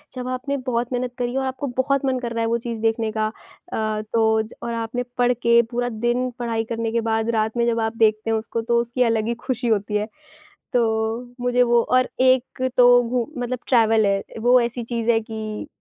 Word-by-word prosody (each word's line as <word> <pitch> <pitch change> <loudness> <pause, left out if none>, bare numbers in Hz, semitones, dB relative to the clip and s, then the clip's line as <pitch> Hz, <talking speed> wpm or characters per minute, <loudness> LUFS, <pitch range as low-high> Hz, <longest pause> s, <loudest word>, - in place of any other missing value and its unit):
जब 250 0 -5
आपने 260 +2 -2
बहुत 240 -1 -1
मेहनत 250 0 -2
करी 245 0 -2
हो 270 - +1
आपको 265 +1 -3
बहुत 275 +1 +1
मन 260 -1 +1
कर 240 -1 -4
रहा 230 - -1
है 225 - +1
वो 235 +1 +1
चीज़ 230 -2 -4
देखने 225 0 0
का 215 0 0
अ, 215 0 -5
तो 220 -1 +3
ज 215 - -12
और 235 - -3
आपने 230 +2 -3
पढ़ 245 0 +3
के 235 0 +4
पूरा 245 +1 -1
दिन 240 +3 -1
पढ़ाई 230 -2 -1
करने 225 -1 -2
के 230 0 +1
बाद 225 +1 0
रात 220 +2 0
में 235 - +2
जब 230 -1 +1
आप 225 +1 -2
देखते 215 0 +2
हैं 225 - +2
उसको 225 +1 -3
तो 235 +1 +1
उसकी 240 +2 0
अलग 225 -2 +1
ही 235 - 0
खुशी 250 -2 -1
होती 210 -1 0
है। 210 +1 -2 0.7
तो 225 0 0
मुझे 245 0 +2
वो 240 -1 +4
और 255 +1 +2
एक 255 0 +2
तो 245 0 +7
घूम 245 +3 -3
मतलब 250 +1 -2
ट्रैवल 225 -3 +4
है, 195 0 +1 0.2
वो 245 +2 +5
ऐसी 235 0 -2
चीज़ 235 0 -1
है 225 -1 +3
कि 215 -1 -5
235 Hz, 220 wpm, -22 LUFS, 225-245 Hz, 0.7 s, तो